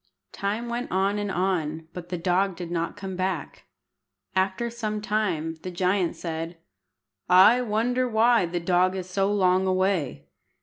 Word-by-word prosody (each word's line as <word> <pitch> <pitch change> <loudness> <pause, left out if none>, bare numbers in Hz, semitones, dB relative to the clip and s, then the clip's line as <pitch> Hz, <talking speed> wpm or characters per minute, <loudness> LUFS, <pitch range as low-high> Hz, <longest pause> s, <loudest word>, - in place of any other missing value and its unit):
Time 210 +4 -3
went 240 +1 -3
on 195 +2 +1
and 205 -1 -2
on, 165 -4 -1
but 175 -1 -8
the 180 - -2
dog 185 +2 +1
did 175 -1 -7
not 170 +2 -2
come 195 -2 -5
back. 185 -4 -3 0.7
After 190 +5 0
some 215 -2 -3
time 195 -7 -1
the 185 - -5
giant 180 0 0
said 165 0 -5 0.7
"I 190 +7 +7
wonder 245 +3 0
why 225 -3 +4
the 175 +1 -2
dog 180 +2 +2
is 185 -1 -4
so 195 +2 0
long 190 -2 +3
away. 185 -6 0
190 Hz, 150 wpm, -26 LUFS, 175-210 Hz, 0.7 s, I